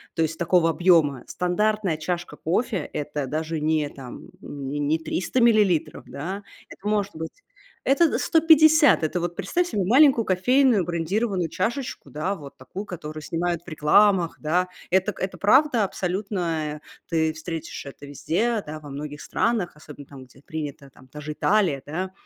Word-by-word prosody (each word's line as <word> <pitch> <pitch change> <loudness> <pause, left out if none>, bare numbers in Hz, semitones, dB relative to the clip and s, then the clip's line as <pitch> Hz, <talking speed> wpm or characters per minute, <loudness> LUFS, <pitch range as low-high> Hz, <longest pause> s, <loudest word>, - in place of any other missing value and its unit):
То 165 - 0
есть 160 0 -2
такого 170 -1 +3
объёма 160 -7 +3
стандартная 190 -1 0
чашка 175 -1 -4
кофе- 200 +6 0 0.2
это 145 -2 -3
даже 155 +2 -3
не 155 -1 0
там, 130 -4 -11
м 140 -2 -7
не 145 +1 -3
не 150 +2 +1
300 180 +9 -2
миллилитров, 195 -9 +2
да, 190 +8 -5 0.3
это 205 - -9
может 205 -3 0
быть, 160 - -8 0.4
это 300 +4 +4
д - - 0
150. 315 - +5
Это 175 +3 0
вот 175 0 -3
представь 350 - -1
себе 205 - -1
маленькую 255 +3 +5
кофейную 225 - +3
брендированную 180 +1 -1
чашечку, 235 - -3
да, 170 +8 -2
вот 145 -5 -11
такую, 185 +11 -8
которую 155 -5 -7
снимают 170 +1 -2
в - - -35
рекламах, 175 +3 +3
да. 180 +4 0 0.2
Это 190 +3 +2
к - - -15
это 190 - -3
правда 250 +1 +4
абсолютная. 175 -6 -2 0.3
Ты 160 -2 +1
встретишь 160 -1 -6
это 140 +1 -10
везде, 205 - -1
да, 155 +1 -7
во 145 -2 -11
многих 145 +1 -6
странах, 220 -8 -1
особенно 150 -2 -12
там, 135 -2 -12
где 130 +2 -20
принято, 145 -3 -6
там, 130 0 -19
та 150 +3 -10
же 150 +1 -5
Италия, 180 -8 +2
да. 185 +5 -4
175 Hz, 165 wpm, -24 LUFS, 150-205 Hz, 0.4 s, 150